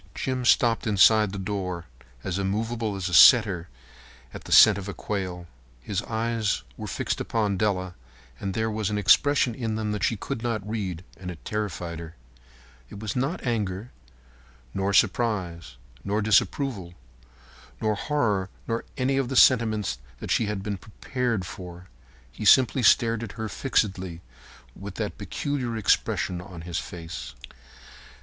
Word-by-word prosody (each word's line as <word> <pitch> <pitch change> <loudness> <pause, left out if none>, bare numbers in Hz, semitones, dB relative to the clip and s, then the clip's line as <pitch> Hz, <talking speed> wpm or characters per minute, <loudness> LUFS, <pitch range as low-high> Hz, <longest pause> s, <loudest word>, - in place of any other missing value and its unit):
Jim 130 -1 -2
stopped 115 +1 +3
inside 105 0 +5
the 100 - -5
door, 95 -3 -4 0.4
as 95 0 -2
immovable 110 +2 -2
as 95 -1 -3
a 90 - -5
setter 100 -5 +7 0.6
at - - -9
the - - -9
scent 105 -3 +8
of 100 0 -7
quail. 90 -4 -4 0.3
His 95 - -3
eyes 115 - -1
were - - -7
fixed - - -2
upon 105 -3 0
Della, 95 -2 -1 0.5
and 95 -1 -4
there 110 0 0
was 110 -1 -1
an 105 - -1
expression 125 +6 +4
in 110 -2 -3
them 110 -1 -2
that 105 -1 -3
she 115 - +1
could 130 +4 -5
not 110 -4 -2
read, 95 -6 -4
and 90 0 -7
it 85 -3 -10
terrified 90 -6 -4
her. 85 -1 -9 0.7
It 100 - -10
was 105 -2 -4
not 135 +8 -2
anger, 110 -2 -2 0.8
nor 95 +1 -1
surprise, 95 - 0 0.3
nor 105 +2 -1
disapproval, 105 -3 +1 0.8
nor 110 - +1
horror, 105 -7 0 0.2
nor 115 0 -2
any 135 +1 +1
of 135 -3 0
the 135 - -3
sentiments 110 - +4 0.2
that - - -5
she 110 - +2
had 105 -2 -3
been 100 -1 -3
prepared 115 +1 -3
for. 90 0 -10 0.4
He 105 - -8
simply 130 +3 +5
stared 115 0 +4
at 115 -3 -6
her 110 -1 -4
fixedly 95 -8 -1 0.5
with - - -8
that - - -4
peculiar 130 -5 -3
expression 90 -3 +1
on 90 -2 -10
his 85 0 -3
face. 80 -8 -8
105 Hz, 150 wpm, -26 LUFS, 95-115 Hz, 0.8 s, scent